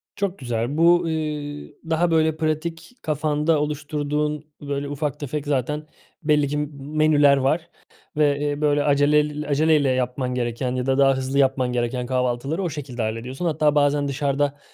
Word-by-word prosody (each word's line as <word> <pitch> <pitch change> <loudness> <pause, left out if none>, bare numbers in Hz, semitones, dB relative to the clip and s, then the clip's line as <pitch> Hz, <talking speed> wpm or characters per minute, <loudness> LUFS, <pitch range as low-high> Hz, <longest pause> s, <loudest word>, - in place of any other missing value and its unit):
Çok 200 -1 -2
güzel. 120 +2 -2
Bu, 170 +1 +6
ııı, 150 -2 -4 0.2
daha 165 +1 +2
böyle 160 -1 +2
pratik 165 +5 -3
kafanda 150 +1 +1
oluşturduğun 150 0 -2 0.2
böyle 140 0 -3
ufak 145 0 -3
tefek 145 +1 -4
zaten 150 +2 -1 0.4
belli 150 -1 +3
ki, 145 +2 -2
m 150 0 -1 0.3
menüler 145 -2 +5
var 140 +5 0 0.5
ve, 145 -2 +3
eee, 145 0 -2
böyle, 145 -1 +2
aceleyl 150 +1 +2
acele 155 +2 +4
ile 140 -2 +1
yapman 125 0 -1
gereken 125 +1 -2
ya 125 -1 -2
da 135 0 +1
daha 135 -1 +5
hızlı 130 +1 -1
yapman 130 -2 +2
gereken 125 +1 -1
kahvaltıları 130 +6 -1
o 175 - -1
şekilde 135 -5 -6
hallediyorsun. 115 +8 -4
Hatta 150 -2 +2
bazen 145 0 +2
dışarıda 140 0 -1
145 Hz, 160 wpm, -23 LUFS, 135-150 Hz, 0.5 s, Bu